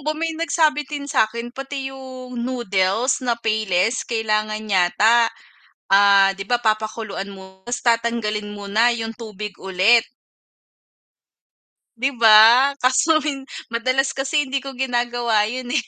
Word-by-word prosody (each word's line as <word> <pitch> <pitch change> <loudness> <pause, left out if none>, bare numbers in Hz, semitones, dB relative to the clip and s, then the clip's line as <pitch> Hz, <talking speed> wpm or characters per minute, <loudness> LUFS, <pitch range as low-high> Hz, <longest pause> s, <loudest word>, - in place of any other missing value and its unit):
ba 305 +2 -3
may 325 0 -2
nagsabi 315 -2 +1
din 290 -1 -5
sa'kin 235 -3 -1
pati 270 0 -6
'yung 255 -2 -9
noodles 235 -1 -1
na 245 -2 -1
Payless 220 -1 0
kailangan 215 -1 -1
yata, 215 +4 +3 0.6
ah, 195 0 +5
'di 195 - -6
ba 240 +4 0
papakuluan 215 -3 -3
mo 190 -1 -14
'tas 240 +2 -4
tatanggalin 230 -3 -1
mo 205 -1 -8
na 225 +4 +3
'yung 225 -1 -4
tubig 210 -3 -8
ulit. 190 +5 +3 1.9
'Di 260 +4 0
ba, 230 +5 +6
kaso 290 +5 +3
min 275 -3 -4 0.3
madalas 255 +3 0
kasi 275 +2 -1
hindi 270 +1 -3
ko 275 0 -8
ginagawa 240 -4 0
'yun 250 +1 -6
eh. 300 - +2
235 Hz, 130 wpm, -21 LUFS, 215-260 Hz, 1.9 s, ba